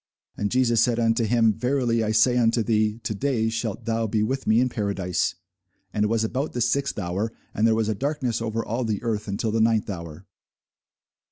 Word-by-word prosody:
And 105 - -1
Jesus 120 -2 +3
said 120 -1 +2
unto 115 0 +2
him, 115 0 +3
Verily 125 -1 0
I 110 - 0
say 115 +3 +4
unto 115 -1 +2
thee, 110 -1 +1
To 120 - -2
day 115 0 0
shalt 110 -2 -4
thou 115 -1 0
be 105 0 0
with 130 +5 -2
me 110 +1 +4
in 125 - +3
paradise. 100 -6 -1 0.6
And 105 - +1
it - - +3
was 115 0 +1
about 130 +7 -2
the 120 - -2
sixth 140 +4 0
hour, 100 +3 -2 0.2
and 110 +2 +2
there 110 - +3
was 110 -1 0
a 110 - +1
darkness 130 -1 -2
over 115 0 -2
all 120 +3 -2
the 110 -2 -2
earth 110 -3 -2
until 105 +3 -2
the 110 +1 +1
ninth 110 -2 +2
hour. 85 -1 -8
115 Hz, 205 wpm, -24 LUFS, 105-120 Hz, 0.6 s, say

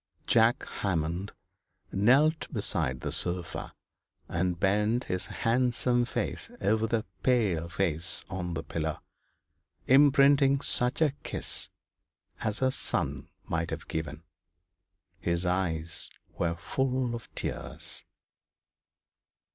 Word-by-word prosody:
John 115 +1 +5 0.3
Hammond 90 0 -1 0.6
knelt 140 +10 +3
beside 65 0 -1
the - - -3
sofa, 85 -1 -3 0.5
and 90 0 -1
bent 105 +5 +2
his 90 0 -2
handsome 120 +1 +1
face 125 - -3
over 110 +1 +2
the 110 -1 0 0.2
pale 100 -10 +2
face 85 0 0
on 90 -3 -4
the - - -3
pillow, 80 -1 -3 0.9
imprinting 140 0 +6
such 125 +2 +2
a 150 -3 +2
kiss - - -1 0.7
as 110 +2 -1
a 130 - +4
son 70 - -1 0.2
might 85 -3 -1
have - - -5
given. 80 -1 -4 1.0
His 85 0 0
eyes 85 -3 0 0.3
were 85 -1 0
full 125 +7 -1
of 120 -1 -7
tears. - - -3
100 Hz, 105 wpm, -29 LUFS, 85-125 Hz, 1.0 s, imprinting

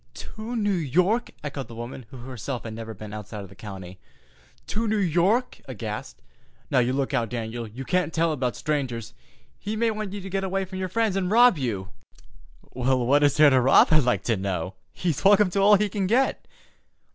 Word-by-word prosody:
"To 225 +2 -7
New 205 -3 +1
York!" 180 - +1
echoed 140 -3 -5
the 115 - -11
woman, 120 +1 -7
who 130 - -11
herself 125 0 -6
had 110 - -6
never 110 0 -7
been 105 +1 -9
outside 105 -1 -7
of 95 - -11
the 95 - -15
county. 95 -3 -9 0.7
"To 225 +2 -2
New 215 0 +1
York!"—aghast. 195 +7 -1 0.5
"Now, 135 - +4
you 125 0 +2
look 135 +1 -1
out, 120 -4 0
Dan'l. 115 -1 -4
You 125 +5 -8
can't 180 -1 0
tell 165 -1 +1
'bout 125 -3 -2
strangers. 120 -7 -3 0.5
He 210 +2 -4
may 230 +1 +1
want 215 -2 -4
to 205 - -5
get 195 0 -2
you 190 - -2
way 195 +1 -1
from 185 0 -7
your 185 -1 -2
friends 220 0 0
an' 185 -2 0
rob 235 -4 +6
you." 100 -7 -3 0.8
"What 130 +2 +2
is 145 -1 +3
there 150 -1 +7
to 130 -1 +4
rob, 130 +2 +6
I'd 155 -1 +6
like 125 -2 0
to 115 - +1
know? 95 -2 -3 0.2
He's 170 -6 -2
welcome 200 -1 +5
to 195 - 0
all 205 +2 +7
he 210 +1 +2
can 200 -1 -2
get." 255 +6 +1
145 Hz, 200 wpm, -25 LUFS, 120-195 Hz, 0.8 s, there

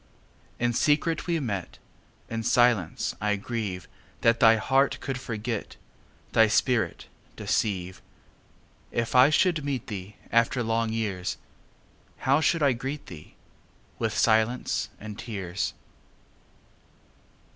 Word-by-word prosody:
In 120 0 +1
secret 155 +6 +1
we 170 -2 +1
met:In 115 - -7
silence 115 - +2
I 105 0 +1
grieveThat 110 +1 -2
thy 115 0 +7
heart 135 +5 +2
could 135 -1 -4
forget, 115 -3 -4 0.6
Thy 110 0 +5
spirit 120 +2 +1 0.3
deceive. 95 -3 -1 0.9
If 115 -1 -1
I 130 +2 +7
should 155 0 +2
meet 140 -4 -2
theeAfter 110 +4 -1
long 115 0 0
years, 105 -5 -2 0.8
How 140 +3 +2
should 160 +1 +2
I 140 -2 +4
greet 135 +5 -5
thee?—With 100 +6 -8
silence 110 +2 +2
and 105 0 -8
tears. 100 -6 -4
115 Hz, 100 wpm, -27 LUFS, 105-130 Hz, 0.9 s, thy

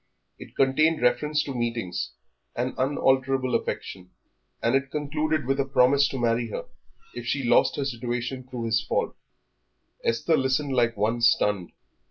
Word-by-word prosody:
It - - -12
contained 155 +4 +3
reference 150 +5 +2
to 140 - -5
meetings 115 -7 -3 0.4
and 125 +2 -2
unalterable 130 -1 +1
affection, 90 -1 -3 0.5
and 115 - +1
it 135 0 +1
concluded 150 0 -1
with 135 +2 0
a - - +3
promise 135 +1 +4
to 135 - -5
marry 120 -1 0
her - - -5 0.5
if 120 -1 -7
she 140 +1 -1
lost 120 - +3
her 140 - -2
situation 125 0 -4
through 125 -2 -5
his 110 -1 +2
fault. - - -1 0.9
Esther 140 +8 +2
listened 130 +1 0
like 120 -3 +2
one 110 +3 0
stunned. 105 -6 +2
130 Hz, 150 wpm, -26 LUFS, 120-140 Hz, 0.9 s, promise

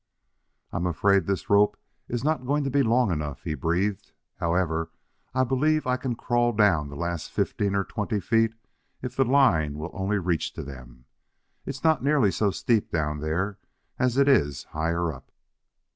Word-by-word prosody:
"I'm 90 +1 -1
afraid 100 +4 +2
this 100 -1 -2
rope 100 0 +4 0.3
is 120 0 -3
not 150 -4 0
going 145 +2 +1
to 135 - -2
be 140 +1 +3
long 120 -3 +3
enough," 75 -3 -4
he - - -2
breathed. 90 +6 -1 0.3
"However, 85 -1 0 0.5
I 130 - +3
believe 150 +5 +1
I 125 0 +2
can 130 -1 -3
crawl 120 0 +1
down 95 -9 +3
the 70 - -9
last 85 +1 -3
fifteen 100 -1 -1
or 100 - +2
twenty 105 +2 -2
feet 115 +2 +1 0.5
if 125 - -5
the 135 - +4
line 95 - +3
will 80 +3 -5
only 100 +1 -1
reach 85 -4 -1
to - - -6
them. 65 -2 -11 0.6
It's 135 0 -5
not 160 -4 +3
nearly 140 -8 +3
so 105 +1 +1
steep 115 +1 0
down 75 -2 -1
there 85 +7 -2 0.4
as 125 0 +1
it 140 0 +4
is 75 - +3
higher 85 +1 -1
up." 65 - -14
100 Hz, 175 wpm, -26 LUFS, 80-125 Hz, 0.6 s, rope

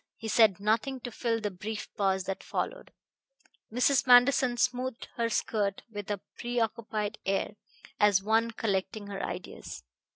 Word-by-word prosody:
He 225 - -6
said 215 -4 +5
nothing 225 +6 0
to 245 - -6
fill 230 0 -1
the 210 -2 -2
brief 210 +3 -5
pause 190 -2 +1
that 195 0 -4
followed. - - -4 0.8
Mrs. 255 +3 +3
Manderson 245 0 +6
smoothed 250 0 -1
her 230 -1 0
skirt 205 -3 -1
with 205 -1 -6
a 205 -2 -1 0.2
preoccupied 225 -3 -2
air, 195 +2 -1 0.4
as 200 -2 +4
one 225 +2 +2
collecting 210 -2 -2
her 200 -1 -5
ideas. 65 - -6
220 Hz, 140 wpm, -29 LUFS, 200-240 Hz, 0.8 s, Manderson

